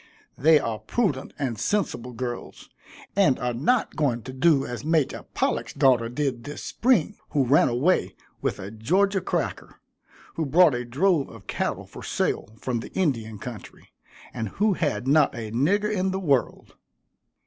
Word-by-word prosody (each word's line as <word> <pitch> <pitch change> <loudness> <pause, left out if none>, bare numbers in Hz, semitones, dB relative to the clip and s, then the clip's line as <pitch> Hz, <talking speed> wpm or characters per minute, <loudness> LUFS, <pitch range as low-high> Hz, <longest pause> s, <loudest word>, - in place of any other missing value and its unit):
They 155 +4 +5
are 115 -5 -3
prudent 140 - -1
and 125 -7 -3
sensible 125 - -1
girls, 120 0 -6 0.4
and 150 -10 +4
are 125 0 -2
not 185 - +1
going 130 -7 0
to 130 - -8
do 140 0 +3
as 120 +2 -6
Major 155 -2 0
Pollack's - - -1
daughter 120 -4 +3
did 130 -2 -2
this 145 +4 -7
spring, 220 - +1 0.2
who 140 -3 +3
ran 140 +5 +4
away 135 +10 +1 0.3
with - - -1
a 95 +2 -7
Georgia 190 - +1
cracker, - - -3 0.6
who 160 -2 -1
brought 165 +1 +5
a 125 0 -3
drove 150 +5 +1
of 110 -3 -13
cattle - - -2
for - - -11
sale - - -1
from 120 +1 -2
the - - -8
Indian 115 - -1
country, 115 +1 -10 0.4
and 110 -2 -3
who 210 - +1
had 145 - -1
not 145 0 +4
a 110 -2 -5
nigger 200 - +1
in 190 -1 0
the 190 0 -2
world. 140 -9 0
135 Hz, 160 wpm, -25 LUFS, 120-175 Hz, 0.6 s, They